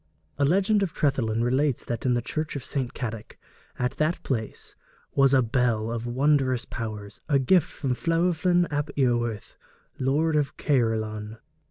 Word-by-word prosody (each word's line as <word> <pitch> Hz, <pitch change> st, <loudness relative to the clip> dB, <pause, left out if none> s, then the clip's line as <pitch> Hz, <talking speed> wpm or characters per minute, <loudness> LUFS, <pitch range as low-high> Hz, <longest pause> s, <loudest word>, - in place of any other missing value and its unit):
A 140 Hz, -, +4 dB
legend 200 Hz, +7 st, +3 dB
of 190 Hz, -5 st, -1 dB
Trefethin 120 Hz, -7 st, +1 dB
relates 130 Hz, +2 st, +1 dB
that 120 Hz, +1 st, -3 dB
in 125 Hz, -, +3 dB
the 120 Hz, -, -1 dB
church 155 Hz, +4 st, -3 dB
of 140 Hz, -, -5 dB
St. 130 Hz, -4 st, -2 dB
Cadoc, 110 Hz, -3 st, -6 dB, 0.4 s
at 125 Hz, +1 st, -2 dB
that 155 Hz, +3 st, 0 dB
place, 110 Hz, -5 st, -4 dB, 0.4 s
was 135 Hz, -1 st, +4 dB
a 135 Hz, -2 st, +5 dB
bell 115 Hz, -2 st, 0 dB
of 115 Hz, 0 st, -3 dB
wondrous 130 Hz, -1 st, +2 dB
powers, 105 Hz, -3 st, -6 dB
a 140 Hz, -, +4 dB
gift 150 Hz, +5 st, +3 dB
from 135 Hz, -4 st, -2 dB
Llewellyn 175 Hz, +1 st, +3 dB
ap 145 Hz, +1 st, -1 dB
Iorwerth, 120 Hz, -5 st, 0 dB, 0.4 s
Lord 150 Hz, +5 st, +1 dB
of 145 Hz, -2 st, 0 dB
Caerleon. 110 Hz, -5 st, 0 dB
130 Hz, 155 wpm, -26 LUFS, 115-150 Hz, 0.4 s, a